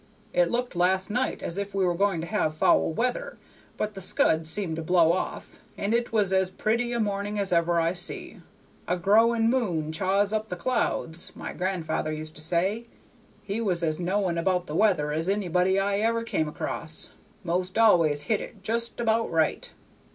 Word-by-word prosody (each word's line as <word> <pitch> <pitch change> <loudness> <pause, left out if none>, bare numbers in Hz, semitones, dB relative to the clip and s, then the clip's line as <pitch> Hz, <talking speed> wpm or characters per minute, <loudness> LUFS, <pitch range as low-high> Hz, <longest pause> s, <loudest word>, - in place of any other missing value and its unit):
It - - +3
looked 245 -3 -2
last 185 +2 +1
night 250 +4 -1
as 170 +4 -3
if 200 0 -5
we 195 -1 +2
were 175 - +2
going 190 -2 +1
to - - -4
have 170 -5 -1
foul 155 - +3
weather, 245 +8 -2 0.4
but 215 0 -2
the 195 - -7
scud 160 -3 +2
seemed 160 -1 -1
to - - -3
blow 170 0 +4
off, 185 - -4 0.2
and 200 +3 -1
it 235 0 0
was 205 -4 +2
as 190 -1 +2
pretty 230 +5 -1
a 240 - -1
morning 205 -1 -2
as 200 -2 0
ever 170 0 +2
I 165 +1 +1
see. 175 0 -5 0.5
'A 180 - 0
growing 225 +5 +4
moon 180 -11 0
chaws 195 +5 +1
up 215 0 -1
the 180 - -4
clouds,' 175 -6 -1
my - - -6
gran'ther 175 -4 -2
used 155 0 -6
to - - -7
say. 185 +8 0 0.6
He 205 +2 -3
was 180 -6 0
as 155 -1 0
knowing 180 -1 0
about 180 +1 0
the 150 - -7
weather 175 -8 +2
as 160 +4 -1
anybody 190 -1 +1
I 200 +1 0
ever 230 +1 +1
come 160 -8 -1
across; 155 +1 -4 0.3
'most 180 +2 -2
always 165 -10 +4
hit 215 +6 0
it 200 -3 -10
just 230 +3 -1
about 230 -1 +1
right. 160 -1 0
190 Hz, 190 wpm, -26 LUFS, 170-215 Hz, 0.6 s, blow